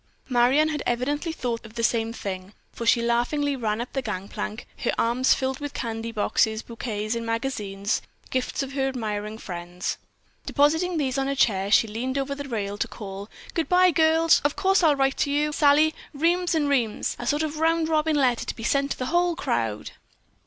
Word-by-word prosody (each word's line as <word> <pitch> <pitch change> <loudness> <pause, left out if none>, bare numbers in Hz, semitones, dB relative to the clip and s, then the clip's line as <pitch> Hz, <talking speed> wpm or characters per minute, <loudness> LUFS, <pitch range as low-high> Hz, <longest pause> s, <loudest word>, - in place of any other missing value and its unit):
Marion 255 +5 +4
had 300 -1 -2
evidently 290 +7 -1
thought 245 -7 -3
of 220 0 -13
the 230 - -2
same 230 -1 +1
thing, 195 -3 -6 0.2
for 235 - -5
she 235 0 +4
laughingly 260 +5 +1
ran 220 -4 -1
up 240 - -5
the 270 - -1
gang 200 -5 -4
plank, 215 +2 -5
her - - 0
arms 240 +3 +3
filled 265 0 -2
with 290 -1 -6
candy 230 -1 -3
boxes, 220 0 +1
boquets 215 -2 -4
and 230 0 -3
magazines, 220 -4 -2 0.3
gifts 260 +2 -1
of 270 0 -7
her 270 -1 0
admiring 215 -4 -3
friends. 175 -2 -5 0.5
Depositing 320 +5 +2
these 270 -3 0
on 270 - 0
a 275 - -1
chair, 200 -6 +2
she 225 - +5
leaned 250 +5 -3
over 275 0 -1
the 280 0 -7
rail 205 -3 -3
to - - 0
call: 200 -1 -8 0.2
"Good 330 - -1
bye, 365 0 +5
girls! 320 +1 +4
Of 290 0 +1
course 385 0 +3
I'll 310 -4 +5
write 270 0 +1
to - - +1
you, 300 +1 +1
Sally, 300 +1 +4 0.2
reams 345 +3 +2
and 300 -2 +2
reams; 240 -7 0
a 240 - -5
sort 295 +2 +1
of 310 0 -3
a - - -5
round 325 0 +2
robin 315 -1 +2
letter 255 -5 +2
to - - -3
be 225 - -8
sent 280 +4 +1
to - - -15
the 255 - -3
whole 350 0 +3
crowd. 115 - -2
255 Hz, 200 wpm, -25 LUFS, 225-295 Hz, 0.5 s, she